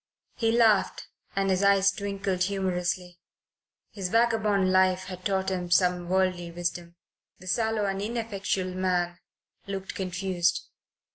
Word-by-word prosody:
He 225 -1 +1
laughed 225 -4 +2 0.3
and 195 0 +1
his 185 0 +1
eyes 195 0 +5
twinkled 200 -2 -3
humorously. 180 -2 -2 0.7
His 190 -3 -4
vagabond 215 -4 +2
life 185 0 +3
had 185 -1 -8
taught 190 -1 0
him 180 -2 -3
some 180 -1 +2
worldly 185 -2 +1
wisdom. 175 0 -4 0.4
The 185 - -15
sallow 220 +2 0
and 195 0 -2
ineffectual 200 -4 -2
man 180 -1 -1 0.5
looked 195 -1 -5
confused. 185 -1 -1
190 Hz, 125 wpm, -27 LUFS, 180-200 Hz, 0.7 s, eyes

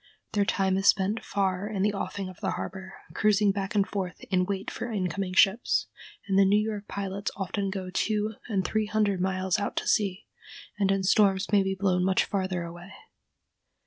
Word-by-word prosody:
Their 205 -2 +2
time 190 -1 +1
is 195 +1 +1
spent 200 +3 +3
far 195 -1 -1
in 200 -3 -1
the 210 0 +2
offing 200 -1 -4
of 185 -2 -11
the - - -1
harbor, 190 0 -6 0.2
cruising 210 -1 +3
back 195 +1 -4
and 200 -1 +3
forth 185 -4 -4
in 180 -1 +3
wait 195 0 -3
for 240 - -5
incoming 185 -2 -2
ships, 110 - +3 0.4
and 195 -1 +3
the - - +7
New 195 +2 +4
York 210 -1 -2
pilots 200 0 -3
often 195 0 -2
go 190 -1 -5
two 215 +2 0
and 195 -5 -1
three 215 -1 0
hundred 205 -3 +1
miles 185 -1 0
out 200 - -3
to - - -2
sea, 200 -2 +1 0.5
and 195 -1 +2
in 195 -1 +1
storms 195 0 +3
may 205 -2 +5
be 195 0 -1
blown 185 -2 +1
much 190 0 +2
farther 185 -3 -2
away. 175 +2 -9
195 Hz, 190 wpm, -27 LUFS, 190-205 Hz, 0.5 s, the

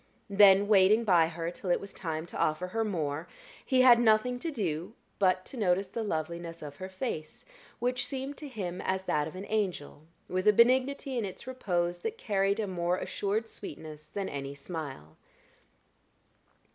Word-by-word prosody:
Then, 200 0 +7
waiting 210 +2 +5
by 175 -6 +5
her 165 +1 -4
till 180 +1 -7
it 175 - +3
was 200 - -9
time 160 -2 -4
to - - -8
offer 155 +4 +1
her 225 +4 0
more, 160 -6 -2 0.4
he 260 -1 +3
had 245 -2 +8
nothing 240 +2 +3
to 330 - -3
do 180 - -3 0.3
but 185 -1 +2
to 265 - -8
notice 190 -2 +1
the 230 +4 -4
loveliness 170 -3 -4
of 145 -1 -8
her 185 +3 -6
face, 185 -6 -5 0.3
which 250 +1 -1
seemed 270 +1 -4
to 300 - -7
him 185 -8 -5
as 190 0 -1
that 150 -5 0
of 160 - -9
an 190 +2 -6
angel, 180 -8 -2 0.2
with 185 +2 -1
a 210 - +8
benignity 260 +3 +3
in - - -1
its 195 +3 -6
repose 175 -9 -1
that 450 +1 -4
carried 200 - +1
a 220 - 0
more 180 -2 -1
assured 210 +4 -2
sweetness 155 -8 -9
than 200 -1 -3
any 140 0 -5
smile. 140 - -7
190 Hz, 175 wpm, -30 LUFS, 170-225 Hz, 0.4 s, had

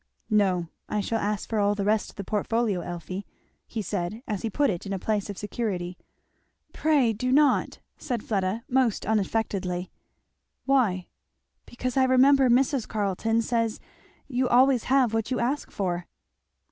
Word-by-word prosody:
"No 190 -5 +2 0.2
I 210 - 0
shall 225 +2 -1
ask 210 0 -2
for 220 - -1
all 205 0 +2
the 200 -1 -2
rest 215 +1 +1
of - - -15
the 200 - -5
portfolio, 215 0 0
Elfie," 175 +3 -6 0.4
he 220 -2 -4
said 200 +4 -3
as 210 -3 -2
he 225 - -2
put 280 +4 +2
it 180 +2 -5
in 195 - -3
a - - -1
place 210 +1 -1
of 200 - -6
security. 195 -5 -3 0.8
"Pray 285 -7 +2
do 255 +4 -2
not!" 285 0 +3 0.2
said 245 -6 -3
Fleda 200 +1 -1
most 255 -5 +1
unaffectedly. 195 -4 -1 0.7
"Why?" 225 -10 +2 0.6
"Because 250 +1 -4
I 260 - +5
remember 260 +1 +5
Mrs. 260 0 +2
Carleton 220 +2 0
says 230 -1 0 0.5
you 255 -1 0
always 255 0 +4
have 255 -3 +3
what 225 -1 -1
you 255 - -1
ask 265 +5 -1
for." 175 -3 -3
220 Hz, 160 wpm, -26 LUFS, 195-250 Hz, 0.8 s, I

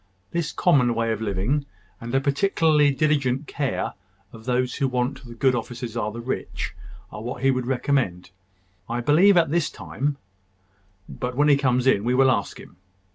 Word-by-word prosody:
This 170 -3 -2
common 130 -9 +3
way 115 0 0
of 110 -1 -3
living, 110 +8 -1 0.3
and 120 +2 -4
a - - +5
particularly 150 +1 +3
diligent 140 -2 +1
care 140 -1 -2 0.4
of 110 -1 -12
those 125 0 0
who 135 - +1
want 125 +2 -2
the 120 -2 -11
good 130 +2 +2
offices 120 0 -5
of 105 -2 -2
the 115 - -6
rich, 130 +3 -4 0.4
are 105 - -7
what 120 +4 -6
he 135 - +5
would 130 -1 -2
recommend, 120 -9 -1 0.6
I 120 +1 -1
believe, 175 +9 +5
at 165 -4 +3
this 170 -2 +1
time: 140 +1 -3 0.9
but 125 0 -5
when 145 +2 +3
he 145 - +7
comes 125 -2 +1
in, 120 -6 +3
we 125 +2 +1
will 130 0 +5
ask 100 -5 -2
him. - - -14
130 Hz, 180 wpm, -24 LUFS, 120-145 Hz, 0.9 s, he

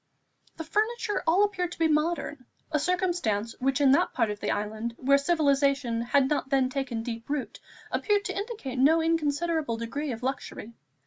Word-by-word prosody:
The 325 - -4
furniture 425 +5 -1
all 360 +5 +5
appeared 365 -4 -1
to - - -12
be 325 - +3
modern, 305 -4 -1 0.2
a 305 - +2
circumstance 340 - 0
which 270 +1 +1
in 275 -2 +5
that 280 - +3
part 230 -4 +1
of 205 - -6
the - - -3
island, 220 +3 -3
where 275 +2 +3
civilization 280 -6 +2
had 265 +3 +2
not 285 -2 -1
then 265 -2 +2
taken 255 -4 -3
deep 230 0 -6
root, 290 -2 -3 0.3
appeared 410 -1 +1
to 380 - -3
indicate 400 - -4
no 310 +5 +5
inconsiderable 320 -4 0
degree 270 +6 -3
of 230 +1 -6
luxury. 255 -3 -4
280 Hz, 175 wpm, -27 LUFS, 250-335 Hz, 0.3 s, all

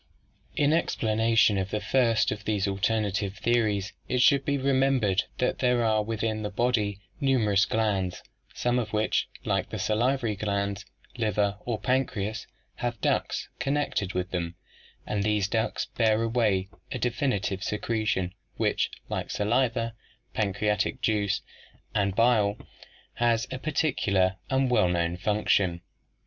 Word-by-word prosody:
In 145 +1 +3
explanation 110 -8 +2
of 95 0 -2
the 105 - -1
first 115 0 +2
of 105 0 -5
these 105 -2 0
alternative 100 0 0
theories 110 -4 +1
it 125 - 0
should 140 0 +5
be 140 0 0
remembered 130 -7 +2
that 125 - 0
there 125 -2 +2
are 110 -1 +3
within 110 0 -2
the 105 - -2
body 105 -2 0 0.2
numerous 110 -7 +3
glands, 100 -5 -1 0.3
some 120 0 0
of 110 -3 -4
which, 110 0 +1 0.2
like - - 0
the - - -4
salivary 115 0 +1
glands, 100 -1 -2 0.3
liver 105 -2 0
or 115 -3 -2
pancreas, 110 -3 -1 0.3
have 120 -2 -3
ducts - - 0
connected 140 -9 -1
with 90 0 -2
them, 85 -1 -3 0.5
and 105 - -1
these 105 -1 +1
ducts 110 +1 -1
bear 110 -1 +1
away 110 -5 +1 0.2
a - - -2
definite 115 -5 -1
secretion 105 -4 -1 0.2
which, - - +1 0.2
like - - -3
the - - -5
saliva, 115 +1 +1 0.4
pancreatic 105 +3 0
juice, 105 -4 +1 0.5
and 100 -2 +1
bile, 110 -3 +3 0.6
has 115 -1 +1
a 130 - -4
particular 105 - +1
and 130 -1 +2
well 90 -7 +4
known 85 -1 0
function. 95 -2 +1
110 Hz, 135 wpm, -27 LUFS, 100-120 Hz, 0.6 s, should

